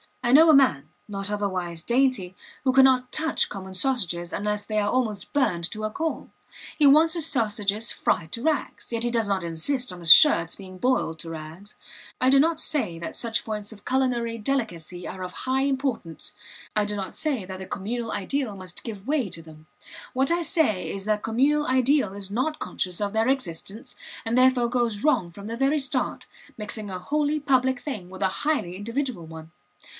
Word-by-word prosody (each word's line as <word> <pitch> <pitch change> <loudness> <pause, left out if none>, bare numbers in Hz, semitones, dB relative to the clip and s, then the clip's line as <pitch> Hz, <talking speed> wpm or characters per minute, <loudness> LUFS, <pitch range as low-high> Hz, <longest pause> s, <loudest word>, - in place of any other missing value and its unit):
I 240 - +1
know 320 +5 +8
a - - +8
man, 155 - +3 0.2
not 195 -1 -3
otherwise 185 -5 -3
dainty, 240 -7 +1 0.3
who 260 -2 +2
cannot 260 -1 +5
touch 320 +1 +2
common 190 -1 -8
sausages 180 -7 0
unless 210 0 -2
they 215 0 -1
are 205 0 +1
almost 220 -5 -1
burned 175 - +1
to 215 0 -5
a 215 - -2
coal. 320 +7 -3 0.5
He 295 - +5
wants 310 +4 +6
his 335 -4 0
sausages 215 -4 0
fried 160 -1 -1
to 230 - -3
rags, 315 -5 -2
yet 230 -1 -1
he 240 - 0
does 230 -3 +1
not 195 -3 0
insist 195 - -1
on 180 - -9
his 165 -2 +10
shirts 170 - +5
being 185 -2 -11
boiled 185 -8 0
to 165 - -7
rags. 165 +5 -9 0.4
I 255 - +3
do 275 +1 +6
not 320 +2 +2
say 275 - +2
that 170 - -6
such 230 -1 -1
points 210 -1 -4
of 205 -2 -14
culinary 245 -3 0
delicacy 195 - -3
are 185 - -7
of 180 - -5
high 260 +1 -1
importance. 265 - -2 0.4
I 210 -1 +3
do 210 0 -2
not 195 -2 -5
say 280 -11 -2
that 190 0 -7
the 190 - -7
communal 225 +3 -4
ideal 230 +2 -2
must 185 -2 -9
give 215 -2 -8
way 285 -6 +1
to 165 - -6
them. 155 -1 -15 0.5
What 265 +4 +1
I 345 +1 +2
say 310 - 0
is 195 0 -5
that 215 0 +2
the - - -20
communal 285 +7 +2
ideal 260 -4 +2
is 200 -1 -7
not 265 +8 -1
conscious 180 +1 -3
of 205 0 -1
their 220 +1 +2
existence, 235 - -3 0.3
and 225 +1 0
therefore 255 -2 +4
goes 235 -4 -1
wrong 250 - +2
from 200 +4 -10
the 230 +1 -5
very 275 +4 +2
start, 270 - -2 0.3
mixing 210 -1 -2
a 185 -1 -5
wholly 295 +8 0
public 260 -3 +2
thing 215 -12 -6
with 190 +1 -6
a 190 - +3 0.2
highly 290 - 0
individual 230 - -3
one. 160 0 -11
225 Hz, 195 wpm, -25 LUFS, 190-265 Hz, 0.5 s, his